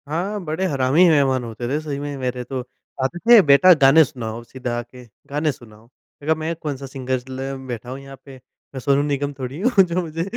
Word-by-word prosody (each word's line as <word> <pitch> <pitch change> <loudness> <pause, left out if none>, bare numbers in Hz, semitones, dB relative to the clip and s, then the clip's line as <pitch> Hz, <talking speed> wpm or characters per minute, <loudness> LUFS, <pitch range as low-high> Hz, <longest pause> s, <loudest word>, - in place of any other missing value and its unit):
हाँ, 185 +7 -2
बड़े 160 +5 -2
हरामी 145 +2 +3
मेहमान 135 -5 +2
होते 120 +1 -6
थे, 145 +3 0
सही 145 -3 -5
में 145 0 -5
मेरे 125 -1 -3
तो। 130 +1 -5 0.4
आते 150 +7 -2
थे, 230 +2 +7
"बेटा, 150 +4 +7
गाने 150 +1 +6
सुनाओ।" 120 -6 -6
सीधा 120 -1 -5
आके 125 +1 -11 0.3
गाने 150 +2 0
सुनाओ। 110 -5 -16
मैंने 135 +4 -19
कहा, - - -5
"मैं 160 +2 -3
कौन-सा 145 -4 -5
सिंगर 130 -1 -3
ल 135 +1 -5
बैठा 120 -1 -6
हूँ 130 +2 -6
यहाँ 135 0 -12
पे। 135 -2 -11 0.4
मैं 135 - -5
सोनू 140 +2 +2
निगम 145 0 -2
थोड़ी 130 +4 -5
हूँ, 220 -4 +4
जो 180 0 -1
मुझे 165 -1 -4
140 Hz, 210 wpm, -21 LUFS, 130-155 Hz, 0.4 s, थे